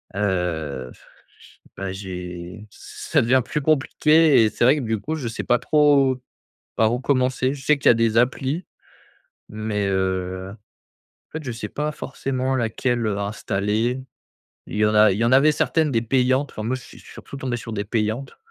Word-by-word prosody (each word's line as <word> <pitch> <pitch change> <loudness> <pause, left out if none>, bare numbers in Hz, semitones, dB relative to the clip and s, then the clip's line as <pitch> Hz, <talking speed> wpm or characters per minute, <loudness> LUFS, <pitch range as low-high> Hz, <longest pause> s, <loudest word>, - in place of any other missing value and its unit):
heu, 85 -10 -2
f - - -21 0.4
ch - - -19 0.2
bah, 95 -1 -4
j'ai 90 +1 -7
ça - - -2
devient 130 +3 +3
plus 150 - -2
compliqué 155 0 +4
et 110 - +3
c'est - - -2
vrai 130 +5 +5
que, 145 - -2
du 110 -2 -1
coup, 155 +10 -4
je 135 -6 -4
sais 115 - -4
pas 120 0 +2
trop 140 -2 +3 0.6
par 110 +1 +2
où 125 - -1
commencer. 130 -1 +1
Je 135 -2 -11
sais 150 - +4
qu'il - - +4
y - - +9
a - - +5
des 115 -1 +1
applis 135 +7 0 0.8
mais 105 -1 -3
heu, 95 -1 -2
en 105 0 -19 0.6
fait, 160 0 -5
je 130 - -4
sais 115 -2 -5
pas 150 +1 -2
forcément 135 -2 -3
laquelle, 120 0 -1
heu, 100 -2 -1
installer. 105 +4 -1 0.7
Il - - -7
y 105 - +3
en 105 - +1
a 105 0 +6
il - - -2
y 115 - +1
en 120 - +2
avait 140 +4 +6
certaines 155 0 +1
des 115 -3 +1
payantes, 130 +3 +1
enfin 110 - -6
moi 125 +4 -1
je 130 - -11
suis - - -14
je - - -18
suis - - -13
surtout - - -10
tombé 130 -3 -2
sur 115 -1 -7
des 105 -1 -3
payantes 110 +5 -2
115 Hz, 200 wpm, -22 LUFS, 105-135 Hz, 0.8 s, y